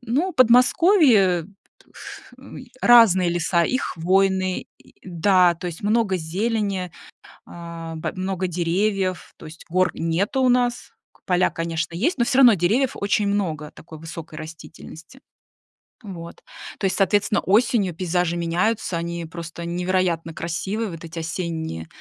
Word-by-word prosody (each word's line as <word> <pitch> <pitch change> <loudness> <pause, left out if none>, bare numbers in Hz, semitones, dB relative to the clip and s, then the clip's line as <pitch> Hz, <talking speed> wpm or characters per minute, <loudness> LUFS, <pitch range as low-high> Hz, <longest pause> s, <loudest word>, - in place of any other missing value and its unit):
ну, 280 +10 -1
Подмосковье 250 - +4 0.5
ф - - -11
м, - - -11 0.2
разные 210 -7 +6
леса, 170 0 +1
и 255 - 0
хвойные, 190 -2 0
и - - -23
да, 180 0 +3
то 180 - -7
есть 170 -2 -7
много 210 -2 +1
зелени, 190 +1 -2 0.5
а, 170 -1 -8
б 160 - -4
много 185 0 -3
деревьев, 185 +2 -1
то - - -12
есть 155 +2 -12
гор 185 +2 +2
нету 175 +10 -1
у 255 - +3
нас 245 -1 0 0.2
к - - -29
поля, 180 0 +2
конечно, 165 0 -4
есть, 260 - 0
но 240 - +3
всё 255 - 0
равно 245 -4 +8
деревьев 215 +9 +1
очень 205 +1 0
много 165 -7 -2
такой 160 -1 -13
высокой 165 -1 -9
растительности. 160 +6 -12 0.9
Вот, 170 -5 -9 0.4
то - - -2
есть, 190 - 0
соответственно, 205 +1 +1
осенью 205 -2 +2
пейзажи 175 0 -1
меняются, 175 +3 -1
они 170 0 -4
просто 170 0 -8
невероятно 175 -1 -1
красивые, 190 +7 -3
вот 165 -2 -9
эти 165 +1 -7
осенние 160 - -4
180 Hz, 140 wpm, -22 LUFS, 165-210 Hz, 0.9 s, равно